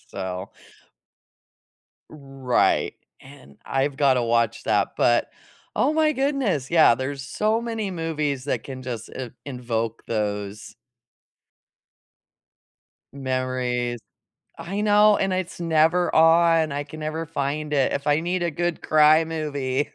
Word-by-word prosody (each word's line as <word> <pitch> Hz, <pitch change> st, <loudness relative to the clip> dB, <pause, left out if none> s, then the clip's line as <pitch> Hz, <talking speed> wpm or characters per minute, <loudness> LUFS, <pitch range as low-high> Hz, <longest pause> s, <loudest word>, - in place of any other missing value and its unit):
So 95 Hz, +1 st, -5 dB, 1.6 s
Right. 135 Hz, -4 st, 0 dB, 0.3 s
And 70 Hz, +1 st, -16 dB
I've 135 Hz, +1 st, -1 dB
gotta 135 Hz, -4 st, +3 dB
watch 115 Hz, -1 st, 0 dB
that, 100 Hz, -1 st, +2 dB
but, 120 Hz, 0 st, +2 dB, 0.4 s
oh 300 Hz, -, +2 dB
my 310 Hz, -1 st, +2 dB
goodness. 265 Hz, -, -1 dB
Yeah, 160 Hz, -8 st, +6 dB
there's 135 Hz, +2 st, -4 dB
so 215 Hz, -, 0 dB
many 225 Hz, -4 st, -3 dB
movies 150 Hz, -6 st, -2 dB
that 145 Hz, -, -2 dB
can 130 Hz, -1 st, -8 dB
just 120 Hz, -3 st, -6 dB
i 125 Hz, -3 st, -5 dB
invoke 115 Hz, -4 st, -4 dB
those 105 Hz, -1 st, -4 dB, 2.4 s
memories. 130 Hz, -2 st, -2 dB, 0.6 s
I 195 Hz, +4 st, -4 dB
know, 210 Hz, 0 st, +5 dB
and 195 Hz, -1 st, 0 dB
it's 185 Hz, -1 st, -4 dB
never 165 Hz, +2 st, +2 dB
on, 165 Hz, -1 st, +4 dB
I 145 Hz, +1 st, -3 dB
can 155 Hz, +2 st, -10 dB
never 155 Hz, +2 st, -3 dB
find 150 Hz, 0 st, -3 dB
it. 140 Hz, -3 st, +2 dB
If 140 Hz, +1 st, -3 dB
I 145 Hz, +1 st, +3 dB
need 175 Hz, +1 st, -2 dB
a 170 Hz, -, 0 dB
good 175 Hz, +2 st, -2 dB
cry 155 Hz, +1 st, +5 dB
movie, 145 Hz, -4 st, -2 dB
145 Hz, 125 wpm, -23 LUFS, 125-165 Hz, 2.4 s, Yeah